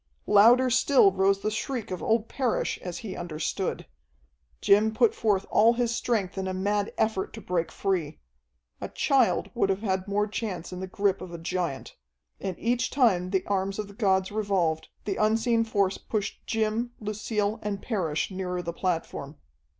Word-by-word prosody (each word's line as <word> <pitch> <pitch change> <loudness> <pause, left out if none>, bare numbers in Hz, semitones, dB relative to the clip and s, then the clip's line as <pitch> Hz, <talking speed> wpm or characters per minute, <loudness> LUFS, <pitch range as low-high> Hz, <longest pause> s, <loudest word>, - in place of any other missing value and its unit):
Louder 245 +5 +6
still 255 -4 +5
rose 195 +1 +2
the 215 - -1
shriek 225 0 -3
of 180 - -4
old 225 0 +1
Parrish 255 -2 -1
as 180 -1 -5
he 195 - -5
understood. 165 -3 -3 0.7
Jim 210 +2 +4
put 235 0 +4
forth 205 -3 +1
all 225 +2 +5
his 235 -1 0
strength 200 -7 -1
in 190 - -2
a 185 - -2
mad 205 +2 0
effort 220 -3 0
to - - -7
break 175 -2 -2
free. 175 -6 -2 0.6
A - - -4
child 265 -4 +2
would 235 -5 +1
have 195 +2 -1
had 190 -2 -1
more 205 +1 +1
chance 195 -5 -5
in 180 - -6
the 190 - -4
grip 195 0 0
of 185 -1 -7
a 170 - -6
giant. 165 -4 -3 0.4
And 190 -3 -4
each 245 +2 0
time 195 -10 +2
the 190 -1 0
arms 195 0 -1
of 210 -1 -3
the 200 - -13
gods 190 -2 +1
revolved, 195 -7 0 0.2
the 200 - -2
unseen 225 +2 +2
force 200 -4 0
pushed 210 -3 -4
Jim, 225 +2 -1
Lucille, 210 0 -2
and 205 -1 -3
Parrish 180 -8 -2
nearer 180 -1 -3
the 170 0 -4
platform. 165 -5 -3
200 Hz, 175 wpm, -27 LUFS, 185-220 Hz, 0.7 s, Louder